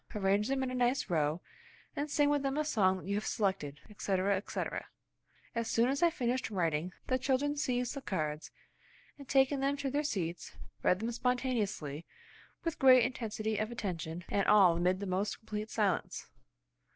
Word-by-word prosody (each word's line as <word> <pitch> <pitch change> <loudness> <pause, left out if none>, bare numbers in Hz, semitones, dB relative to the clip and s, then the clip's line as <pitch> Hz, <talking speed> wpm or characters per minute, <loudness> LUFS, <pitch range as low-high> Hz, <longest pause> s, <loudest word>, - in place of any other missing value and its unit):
Arrange 200 +1 +2
them 270 0 0
in 255 - -2
a - - -4
nice 245 -4 +1
row, 155 +1 +1 0.5
and 295 +1 -2
sing 290 0 +3
with 290 -1 +2
them 275 +1 -1
a 305 - +1
song 190 -9 +2
that 185 - -10
you 200 - -2
have 205 +1 -1
selected," 185 -9 -1
etc., 200 -2 0
etc. 195 - -4 0.7
As 230 -1 -2
soon 235 +2 +3
as 275 +2 -1
I 345 - +6
finished 255 -4 -1
writing, 170 -3 -1
the 255 0 0
children 280 +3 +1
seized 250 -4 -1
the 275 - -6
cards, 155 -9 -3 0.7
and 280 - -12
taking 270 +1 +3
them 275 +1 0
to 275 -1 -2
their 290 +2 +1
seats 180 - -3 0.3
read 185 +2 +2
them 230 +1 -1
spontaneously 230 - -1 0.6
with 330 -2 -3
great 255 -2 +7
intensity 220 -4 -2
of 215 0 -1
attention, 175 -6 -4
and 200 - +1
all 195 -5 +6
amid 180 +2 +1
the - - -2
most 190 +2 -1
complete 215 0 -5
silence. 205 -6 -1
215 Hz, 175 wpm, -32 LUFS, 185-260 Hz, 0.7 s, great